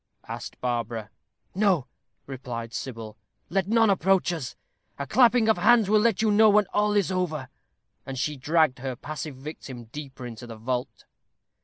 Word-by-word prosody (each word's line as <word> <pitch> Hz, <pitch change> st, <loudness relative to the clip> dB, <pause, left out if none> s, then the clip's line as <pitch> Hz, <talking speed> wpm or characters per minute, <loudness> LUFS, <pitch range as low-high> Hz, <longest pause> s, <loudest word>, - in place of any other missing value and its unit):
asked -, -, -7 dB
Barbara. 115 Hz, -3 st, -3 dB, 0.4 s
"No," 185 Hz, -8 st, +2 dB, 0.4 s
replied 120 Hz, -4 st, -6 dB
Sybil; 115 Hz, -4 st, -6 dB, 0.3 s
"let 190 Hz, 0 st, +1 dB
none 225 Hz, -1 st, +4 dB
approach 190 Hz, -1 st, +2 dB
us. 150 Hz, -8 st, -5 dB, 0.4 s
A 140 Hz, -, -3 dB
clapping 240 Hz, -, +4 dB
of 220 Hz, -5 st, +3 dB
hands 225 Hz, 0 st, +5 dB
will 215 Hz, -, +6 dB
let 225 Hz, -1 st, +2 dB
you 220 Hz, -, +3 dB
know 215 Hz, +1 st, +6 dB
when 210 Hz, 0 st, +5 dB
all 210 Hz, 0 st, +2 dB
is 200 Hz, -2 st, +2 dB
over." 160 Hz, -8 st, -2 dB, 0.5 s
And 135 Hz, -1 st, -6 dB
she 150 Hz, +3 st, -1 dB
dragged 150 Hz, -1 st, +2 dB
her 130 Hz, 0 st, -4 dB
passive 150 Hz, +2 st, -6 dB
victim 130 Hz, -3 st, -8 dB
deeper 135 Hz, -3 st, -8 dB
into 120 Hz, 0 st, -8 dB
the 115 Hz, -1 st, -9 dB
vault. 125 Hz, +2 st, -4 dB
150 Hz, 160 wpm, -26 LUFS, 125-205 Hz, 0.5 s, will